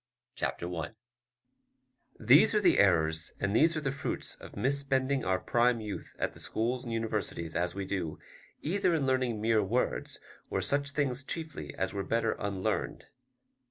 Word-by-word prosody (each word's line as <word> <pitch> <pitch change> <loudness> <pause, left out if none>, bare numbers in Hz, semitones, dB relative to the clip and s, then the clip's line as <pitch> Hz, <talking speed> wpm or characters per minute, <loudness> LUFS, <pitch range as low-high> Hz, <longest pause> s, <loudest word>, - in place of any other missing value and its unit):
Chapter - - -2
I 80 - -4 1.3
These - - +6
are - - +5
the - - +4
errors, 80 -4 +3
and 100 +1 0
these 160 +5 +4
are - - -1
the 135 -2 -1
fruits 140 - -4
of - - -12
misspending 135 0 +1
our 95 0 +2
prime 120 +3 +2
youth 105 -2 -6
at - - -1
the - - -11
schools 120 +3 -1
and 120 - -6
universities, 110 -7 -2
as 85 +1 0
we 100 -1 -3
do, 90 -5 -3 0.5
either 180 +1 +2
in 145 -4 0
learning 130 -4 +1
mere 110 0 +3
words, 120 +6 -1 0.3
or - - 0
such 140 +10 +1
things 140 -3 -1
chiefly 160 +2 -5
as 95 0 -2
were 100 -1 -2
better 115 +1 +1
unlearned. 100 -2 -2
115 Hz, 160 wpm, -30 LUFS, 95-135 Hz, 1.3 s, These